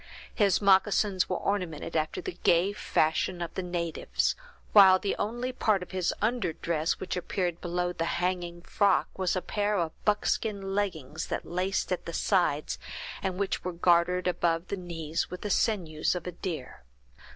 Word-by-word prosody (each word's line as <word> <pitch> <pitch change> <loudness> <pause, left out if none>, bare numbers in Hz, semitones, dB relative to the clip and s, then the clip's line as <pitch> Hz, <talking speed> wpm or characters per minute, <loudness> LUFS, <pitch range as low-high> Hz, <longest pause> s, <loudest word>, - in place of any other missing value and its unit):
His 205 -2 +2
moccasins 195 0 +3
were 185 - 0
ornamented 175 -5 -2
after 155 +2 -1
the 175 - -5
gay 175 +4 +3
fashion 175 -1 0
of 170 -1 -4
the - - -2
natives, 175 -3 -1 0.4
while 190 -3 +9
the 195 +1 -2
only 240 +4 -2
part 215 -6 +1
of - - -12
his 185 -2 0
under 215 -7 +1
dress 165 -1 0
which 190 - -3
appeared 180 -1 -2
below 175 0 -1
the 165 - -2
hunting 175 -1 -2
frock 200 +1 +2
was 185 -1 0
a 185 - -2
pair 205 0 0
of 165 -3 0
buckskin 205 -1 0
leggings, 180 -10 -2
that - - -3
laced 185 +3 -1
at 180 - -2
the 170 - -5
sides, 170 -6 +1 0.4
and 190 -2 -2
which 200 -1 -1
were 180 - -3
gartered 175 +1 +3
above 170 -1 0
the - - -1
knees, 165 -3 -3
with 180 - -7
the 210 - -3
sinews 175 -9 +1
of 180 - -5
a 180 - -3
deer. 165 - -6
180 Hz, 170 wpm, -29 LUFS, 170-195 Hz, 0.4 s, while